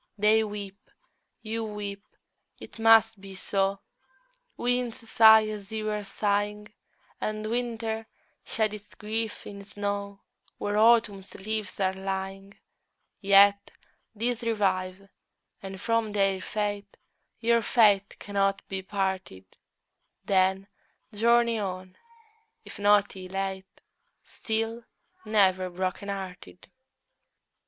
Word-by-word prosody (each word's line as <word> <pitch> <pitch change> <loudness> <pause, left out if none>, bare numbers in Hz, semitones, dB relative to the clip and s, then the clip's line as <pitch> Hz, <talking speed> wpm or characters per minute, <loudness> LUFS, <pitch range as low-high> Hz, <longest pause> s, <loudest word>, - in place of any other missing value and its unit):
They 215 +2 +4
weep, 200 -2 -8 0.5
you 225 0 -3
weep, 205 -2 -6 0.6
it - - -12
must 225 -2 +5
be 195 -1 -10
so; 195 +1 -1 0.8
Winds 245 -2 -2
sigh 220 -1 +7
as 210 -1 -7
you 215 -1 -2
are 210 0 -3
sighing, 210 +1 -2 0.5
And 215 0 -3
winter 225 -2 -2 0.4
sheds 215 -2 -1
its 210 -1 -11
grief 220 +1 -3
in 200 -1 -9
snow 200 0 -4 0.4
Where 205 0 -2
Autumn's 215 -3 +3
leaves 210 -1 -4
are 190 -1 +1
lying: 195 +1 -5 0.6
Yet, 200 0 +5 0.5
these 235 +2 -1
revive, 195 -4 -1 0.5
and 195 -1 -8
from 230 0 0
their 195 -2 +1
fate 205 0 -3 0.4
Your 235 0 +3
fate 205 -3 +3
cannot 195 -1 -1
be 190 -1 -3
parted: 190 - -3 0.8
Then, 190 0 +2 0.5
journey 235 +1 +3
on, 185 -2 -5 0.7
if - - -11
not 205 0 +3
elate, 190 0 -5 0.4
Still, 225 +1 -3 0.4
never 190 -4 +3
broken 185 +3 -3
hearted! 185 - -8
205 Hz, 105 wpm, -27 LUFS, 195-220 Hz, 0.8 s, sigh